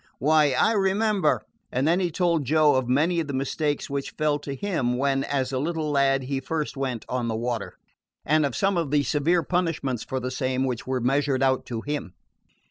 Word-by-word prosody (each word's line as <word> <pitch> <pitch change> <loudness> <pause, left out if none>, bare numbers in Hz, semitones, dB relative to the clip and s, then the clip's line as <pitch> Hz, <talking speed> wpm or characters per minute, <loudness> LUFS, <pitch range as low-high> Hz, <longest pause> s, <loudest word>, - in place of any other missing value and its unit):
Why, 150 +1 +3
I 175 - +3
remember 195 - +1
" - - -47
And 130 +4 0
then 170 +3 +3
he 180 -2 0
told 170 -2 +1
Joe 155 +2 +4
of 130 -2 0
many 160 +7 +2
of 160 - -2
the 140 - -3
mishaps 145 +2 -1
which 140 0 -3
fell 150 -1 +1
to 140 -1 -6
him 130 -9 -1
when, 135 0 +1
as 135 -2 -1
a 130 - -1
little 155 +1 -2
lad, 135 -1 +2
he 135 +1 -2
first 150 +3 -3
went 130 -4 -3
on 125 -2 -2
the 110 - -1
water, 115 -2 -3 0.5
and 155 +1 +3
of 140 -4 -1
some 195 -1 +1
of 165 -4 -1
the 145 0 +2
severe 155 +6 +1
punishments 165 -9 -1
for 130 - -3
the 130 0 -4
same 130 0 -1
which 125 -3 -3
were 130 -1 -1
measured 135 +1 +1
out 130 -1 +1
to 115 -2 -4
him. 145 -9 -4
140 Hz, 215 wpm, -25 LUFS, 130-155 Hz, 0.5 s, Joe